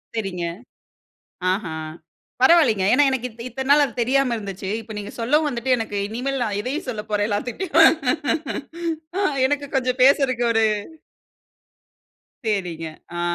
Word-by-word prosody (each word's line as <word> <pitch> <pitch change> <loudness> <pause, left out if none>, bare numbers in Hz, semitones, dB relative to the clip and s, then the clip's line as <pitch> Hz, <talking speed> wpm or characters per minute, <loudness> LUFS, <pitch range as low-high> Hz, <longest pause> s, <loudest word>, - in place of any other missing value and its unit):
சேரிங்க. 185 -5 -3 1.1
ஆஹான். 160 -6 -4 0.5
பரவால்லைங்க. 260 - +5
ஏன்னா 290 - +5
எனக்கு 255 -2 -1
இத்த 230 +1 -11
இத்தன 265 +3 -5
நாளா 290 0 +7
அது 240 - -11
தெரியாம 255 0 +2
இருந்துச்சு. 195 -2 -6
இப்போ 220 0 -10
நீங்க 205 +1 -6
சொல்லவும் 295 +6 +2
வந்துட்டு 250 0 0
எனக்கு 215 -3 -3
இனிமேல் 255 +4 -3
நான் 205 -3 -1
எதையும் 275 +7 -4
சொல்லப் 215 -3 -5
போறேன் 205 0 +1
எல்லாத்துட்டயும். 320 - +3 1.3
அ - - +1 0.3
எனக்கு 285 0 -2
கொஞ்சம் 255 0 0
பேசுறக்கு 260 -3 +3
ஒரு, 225 -1 +3 1.8
சேரிங்க. 180 -6 -2 0.3
ஆ, - - -1
235 Hz, 130 wpm, -22 LUFS, 205-270 Hz, 1.8 s, நாளா